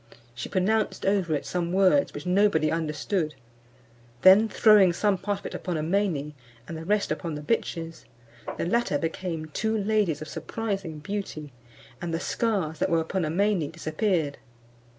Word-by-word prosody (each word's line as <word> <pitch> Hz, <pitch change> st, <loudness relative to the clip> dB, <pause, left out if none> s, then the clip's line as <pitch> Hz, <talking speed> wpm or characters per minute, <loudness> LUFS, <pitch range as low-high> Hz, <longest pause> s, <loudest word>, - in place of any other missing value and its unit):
She 120 Hz, -, -6 dB
pronounced 210 Hz, +3 st, 0 dB
over 190 Hz, -5 st, +2 dB
it 145 Hz, -, -4 dB
some 175 Hz, -1 st, -2 dB
words 195 Hz, +9 st, +4 dB
which -, -, -8 dB
nobody 180 Hz, -4 st, +3 dB
understood; 160 Hz, +1 st, -1 dB, 0.9 s
then 200 Hz, +4 st, +7 dB
throwing 210 Hz, -6 st, +6 dB
some 205 Hz, +3 st, +2 dB
part 200 Hz, +2 st, -3 dB
of -, -, -20 dB
it -, -, -5 dB
upon 180 Hz, -3 st, -3 dB
Amene, 160 Hz, -3 st, 0 dB, 0.3 s
and 165 Hz, -, -6 dB
the 160 Hz, 0 st, -7 dB
rest 210 Hz, +2 st, +1 dB
upon 165 Hz, -4 st, -3 dB
the 150 Hz, -, -5 dB
bitches, 165 Hz, -4 st, -2 dB, 0.5 s
the -, -, -1 dB
latter 230 Hz, -5 st, +1 dB
became 165 Hz, +1 st, -3 dB
two 220 Hz, 0 st, 0 dB
ladies 205 Hz, -7 st, +1 dB
of 155 Hz, -, -7 dB
surprising 190 Hz, 0 st, -4 dB
beauty, 155 Hz, -4 st, -5 dB, 0.5 s
and 175 Hz, -, -3 dB
the 165 Hz, -, -1 dB
scars 190 Hz, -8 st, -1 dB
that -, -, +1 dB
were 165 Hz, -, +3 dB
upon 170 Hz, +2 st, -1 dB
Amene 175 Hz, -1 st, +1 dB
disappeared. 165 Hz, -2 st, -1 dB
180 Hz, 155 wpm, -26 LUFS, 160-205 Hz, 0.9 s, then